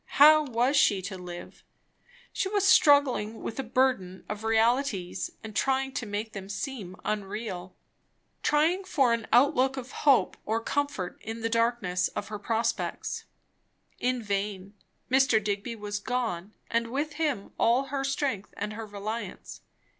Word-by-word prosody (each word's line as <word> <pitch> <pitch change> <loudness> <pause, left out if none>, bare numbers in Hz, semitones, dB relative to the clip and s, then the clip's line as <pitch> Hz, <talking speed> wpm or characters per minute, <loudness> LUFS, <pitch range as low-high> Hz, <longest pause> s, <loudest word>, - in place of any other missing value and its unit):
how 305 +2 +9
was 255 +1 +1
she 205 -8 +4
to 190 +1 -5
live? 180 -1 -9 0.7
She 380 - -1
was 400 -1 +2
struggling 270 - +4
with 230 - -5
a - - 0
burden 235 -7 0
of 210 +1 -5
realities 225 -3 +1
and 220 -1 -8
trying 270 +2 +1
to 240 -3 -4
make 210 +2 -4
them 195 -1 -7
seem 205 -4 -5
unreal, 205 -3 -4 0.7
trying 320 +6 +2
for 270 -10 +2
an 230 -1 -2
outlook 265 +1 +4
of 255 0 -6
hope 280 -3 +3
or 220 +2 0
comfort 285 -7 -2
in 225 +1 -6
the 225 - 0
darkness 230 -6 +1
of 205 - -4
her 210 -1 -5
prospects. 230 +2 -2 0.7
In 250 -1 0
vain; 200 -1 -3 0.4
Mr. 260 -5 +4
Digby 205 +3 -2
was 205 -1 -4
gone, 215 -5 -3 0.2
and 230 0 +1
with 290 +5 -2
him 280 -11 -1
all 255 +4 +3
her 275 -1 0
strength 270 -7 -2
and 210 +1 -3
her 220 0 -6
reliance. 210 +3 -6
230 Hz, 145 wpm, -28 LUFS, 205-265 Hz, 0.7 s, how